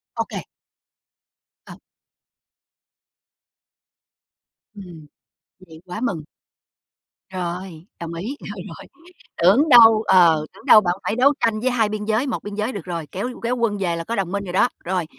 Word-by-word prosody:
OK. - - -5 1.2
Ờ. - - -12 3.0
Ừm. 175 -7 -12 0.5
Vậy 160 -3 -15
quá 185 +4 -7
mừng. 190 -11 -2 1.1
Rồi, 175 -2 -6
đồng 170 -1 -6
ý, 210 +12 -5
rồi, - - -8
rồi. - - -11 0.5
Tưởng 220 - +4
đâu 225 -4 +8
ờ, 170 -5 +5
tưởng - - -17
đâu 215 - +8
bạn 175 -3 0
phải 220 - -2
đấu 265 +4 +4
tranh 225 -4 0
với 255 +4 0
hai 230 -4 +1
biên 210 0 -4
giới. 220 +5 0
Một 250 - -4
biên 205 0 -7
giới 215 +4 -2
được 200 -8 -7
rồi, 170 -3 -5
kéo 200 +7 -4
kéo 240 +2 0
quân 230 -4 -1
về 180 -4 -1
là 165 - -5
có 230 +7 -4
đồng 190 -4 -2
minh 200 0 -2
rồi 180 -2 -7
đó. 220 +6 +3 0.2
Rồi, 180 -1 -1
200 Hz, 160 wpm, -21 LUFS, 175-225 Hz, 3.0 s, đâu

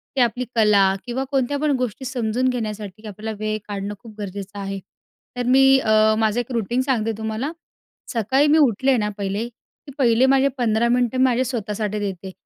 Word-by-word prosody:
ते 265 - +2
आपली 245 +1 +1
कला 205 -4 +4
किंवा 245 +2 -2
कोणत्या 275 +1 0
पण 300 0 +1
गोष्टी 250 +1 -3
समजून 245 0 0
घेण्यासाठी 215 -3 -5
आपल्याला 215 +2 -6
वेळ 215 0 -1
काढणं 200 0 -4
खूप 225 0 -13
गरजेचं 200 0 -6
आहे. 195 0 -4 0.6
तर 250 - -1
मी 270 +1 +6
अ, 215 -2 +3
माझं 220 +1 +1
एक 245 +1 -4
रूटीन 240 +1 0
सांगते 240 -5 0
तुम्हाला. 220 +6 -3 0.6
सकाळी 260 +6 +2
मी 300 +2 +5
उठले 265 -2 +3
ना 210 -2 0
पहिले, 200 +3 -2
की 245 +4 -18
पहिले 245 -2 +4
माझे 270 +1 +4
15 235 -1 +2
मिनिटं 245 +1 +1
माझे 255 -1 +3
स्वतःसाठी 215 -4 -3
देते. 195 -2 -5
225 Hz, 175 wpm, -22 LUFS, 210-255 Hz, 0.6 s, मी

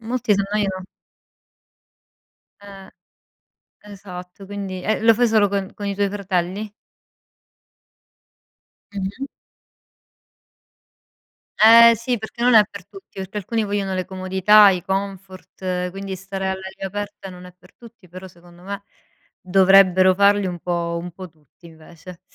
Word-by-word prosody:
Molti 230 -1 -1
si 200 - 0
annoiano 195 -2 -2 1.7
Eh, 195 -1 -13 0.9
esatto, 195 -2 -11
quindi 195 -2 -6
e 215 +2 -1
lo 225 0 +5
fai 245 +2 +2
solo 215 -2 +3
con 195 -1 -3
con 205 - -8
i 200 - -2
tuoi 200 -1 0
fratelli? 200 +1 -3 2.2
Mh-mh. 200 +8 -5 2.3
Eh 230 +2 +8
si! 235 +2 -2
Perché 220 +2 -9
non 250 0 +4
è 215 -2 +8
per 200 -3 -11
tutti, 390 - -16
perché 190 +2 -7
alcuni 220 +3 -2
vogliono 200 -1 -2
le 185 -1 -3
comodità, 190 +3 +4
i 185 -2 -1
comfort, 190 -1 -5
quindi 195 0 -6
stare 190 +1 -5
all'aria 190 0 -5
aperta 205 0 -7
non 180 0 -12
è 180 - -14
per 180 - -22
tutti, 230 -5 -17
però 185 +2 -11
secondo 175 0 -19
me, 200 +1 -7 0.6
dovrebbero 185 0 +5
farli 200 0 +3
un 175 -1 -5
po' 170 -1 -3
un 175 - -8
po' 185 +1 -11
tutti 155 +2 -26
invece. 165 +2 -14
195 Hz, 130 wpm, -21 LUFS, 185-205 Hz, 2.3 s, Eh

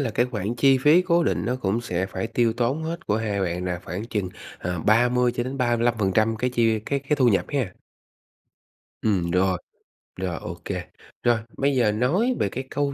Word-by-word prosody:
là 130 -5 0
cái 120 +3 +1
khoản 115 -2 -3
chi 135 +2 +4
phí 150 +7 +5
cố 170 -1 +3
định - - 0
nó 125 +2 0
cũng 110 -1 -1
sẽ 95 -5 -2
phải 115 - -4
tiêu 115 0 +1
tốn 125 +6 -1
hết 165 +2 -5
của 105 - +1
2 105 -3 -1
bạn 90 -1 -2
là 90 -1 -2
khoảng 90 +6 -5
chừng, 105 -5 -2 0.3
ờ, 90 -2 -3
30-35% 120 - +2
cái 125 +3 -1
chi 115 -2 +2
cái 140 +6 -1
cái 145 +2 -1
thu 130 -4 +4
nhập 100 - +2
ha? 125 -11 -2 1.3
Ừm, 90 -6 +1
rồi, 90 0 +2 0.6
rồi, 90 -3 -3
ô - - -7
kê. - - -3 0.4
Rồi, 120 -1 +4 0.2
bây 140 0 +1
giờ 115 -5 +3
nói 175 - +1
về 100 - +1
cái 130 - -4
câu 145 -1 -1
115 Hz, 190 wpm, -24 LUFS, 100-130 Hz, 1.3 s, phí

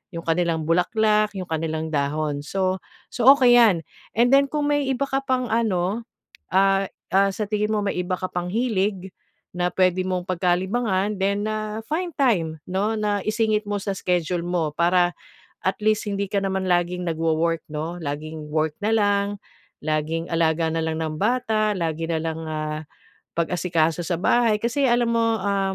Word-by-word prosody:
'yong 165 - -5
kanilang 165 -1 +1
bulaklak, 210 +5 +2
'yong 185 -1 -5
kanilang 160 0 -2
dahon 145 0 -1
so, 185 +3 -1 0.3
so 245 0 0
okey 250 -3 +5
'yan. 200 -8 +4 0.3
And 240 +2 +4
then 275 0 +6
kung 295 -1 0
may 290 -2 +1
iba 265 +1 0
ka 270 0 0
pang 255 -1 +1
ano, 215 -1 0 0.5
ah, 195 +1 +3 0.3
ah, 195 +1 +5
sa 210 +2 -3
tingin 210 0 0
mo - - +1
may 200 - -1
iba 180 +1 -1
ka 185 - -2
pang 175 0 -3
hilig, 200 -5 -1 0.5
na 180 0 +1
pwede 185 0 +2
mong 185 -1 -2
pagkalibangan 190 +3 0
then, 200 +2 0
ah, 215 0 -3
find 345 +3 -2
time 170 - +1
'no, 200 +4 0
na 205 -1 0
isingit 215 0 +1
mo 205 0 -1
sa 200 0 -3
schedule 175 -1 -1
mo 175 -4 -1
para 175 +1 +3 0.5
at 190 +1 +1
least 215 0 +1
hindi 200 0 -1
ka 200 - +1
naman 190 0 -1
laging 175 0 +1
nagwowork, 165 0 0
no? 160 +3 -4
Laging 155 +1 -5
work 155 0 +1
na 220 - +2
lang, 205 -1 +2 0.6
laging 155 +2 -1
alaga 165 0 +2
na 165 - 0
lang 160 0 -2
ng 155 -1 -3
bata, 215 -2 +1
lagi 165 -2 -2
na 165 -1 0
lang, 160 0 -3
ah, 155 0 -3 0.5
pag-asikaso 170 -1 0
sa 175 +1 -1
bahay. 225 +1 +3
Kasi 240 +5 0
alam 240 0 +2
mo, 230 0 +3
ah, 195 -1 0
185 Hz, 170 wpm, -23 LUFS, 165-215 Hz, 0.6 s, then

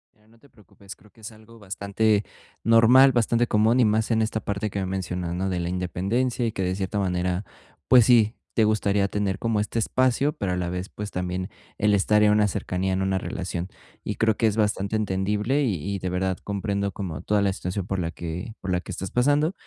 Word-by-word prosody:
Ya, 105 0 -29
no 115 0 -24
te 140 - -22
preocupes, 100 -2 -14
creo 105 -2 -22
que 110 - -22
es 110 - -8
algo 110 +1 -17
bastante 100 +1 0 0.4
normal, 120 +4 +6
bastante 120 0 +1
común 110 +4 +3
y 120 - +5
más 110 +1 +1
en 110 0 +2
esta 110 0 -1
parte 100 +1 -3
que 100 - -4
me 95 - -1
mencionas, 90 -2 -3
¿no?, 95 +1 -1
de 90 -1 -2
la 85 0 -2
independencia 100 +8 -1
y 115 - 0
que 95 - -3
de 90 +1 -1
cierta 100 +2 -3
manera, 90 0 -1 0.4
pues 125 -4 +7
sí, 115 -3 +4 0.2
te 110 - +4
gustaría 100 -2 +2
tener 100 -1 -2
como 115 -1 -1
este 105 +2 -3
espacio, 130 +5 +1
pero 95 -2 -2
a - - 0
la 90 -1 -2
vez, 90 +2 -4
pues 105 0 -7
también 90 0 -3 0.3
el 105 0 +2
estar 105 +2 +3
en 105 - +5
una 105 0 +3
cercanía 95 -1 -2
en 95 - 0
una 95 0 0
relación 90 -1 -4 0.4
y - - -3
creo 110 -1 +2
que 115 - +2
es 105 +1 -1
bastante 105 -1 0
entendible 105 +6 0
y 105 -9 0 0.2
y - - -4
de 90 - -3
verdad 95 0 -1
comprendo 100 0 -2
como 90 -7 -6
toda 105 -1 +1
la 100 - +1
situación 90 0 -4
por 95 -1 -2
la 85 -1 -2
que 85 +6 -6
por 95 - -4
la 90 - +1
que - - -9
estás 95 - -5
pasando, 145 +7 +2
100 Hz, 225 wpm, -25 LUFS, 95-110 Hz, 0.4 s, pues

